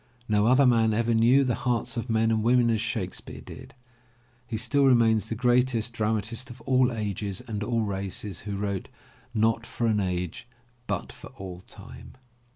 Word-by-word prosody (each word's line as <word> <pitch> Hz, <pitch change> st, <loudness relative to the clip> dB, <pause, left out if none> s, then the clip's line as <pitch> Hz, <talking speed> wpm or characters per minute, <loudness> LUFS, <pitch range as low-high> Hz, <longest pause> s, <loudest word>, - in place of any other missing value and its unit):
No 105 Hz, 0 st, +2 dB
other 130 Hz, +3 st, +5 dB
man 115 Hz, -3 st, +3 dB
ever 115 Hz, +1 st, +1 dB
knew 120 Hz, +5 st, +5 dB
the 125 Hz, -2 st, 0 dB
hearts 120 Hz, 0 st, -1 dB
of 120 Hz, +1 st, -4 dB
men 110 Hz, 0 st, +2 dB
and 110 Hz, -1 st, +1 dB
women 120 Hz, +1 st, +3 dB
as 110 Hz, -1 st, 0 dB
Shakespeare 110 Hz, -5 st, -4 dB
did. -, -, -12 dB, 0.7 s
He 115 Hz, -2 st, -3 dB
still 135 Hz, +5 st, +2 dB
remains 115 Hz, -4 st, +4 dB
the 115 Hz, -, -3 dB
greatest 125 Hz, -1 st, +1 dB
dramatist 110 Hz, +2 st, -1 dB
of 120 Hz, +1 st, -10 dB
all 130 Hz, -1 st, +2 dB
ages 105 Hz, -3 st, -3 dB
and 105 Hz, -2 st, -3 dB
all 115 Hz, +1 st, 0 dB
races 100 Hz, -1 st, -4 dB
who 100 Hz, -1 st, -5 dB
wrote 100 Hz, -2 st, -3 dB, 0.5 s
not 115 Hz, +1 st, +2 dB
for 120 Hz, -, -3 dB
an 110 Hz, -2 st, +2 dB
age 90 Hz, 0 st, -3 dB, 0.4 s
but -, -, -3 dB
for -, -, -12 dB
all 90 Hz, -2 st, -7 dB
time". -, -, -12 dB
115 Hz, 170 wpm, -26 LUFS, 105-120 Hz, 0.7 s, other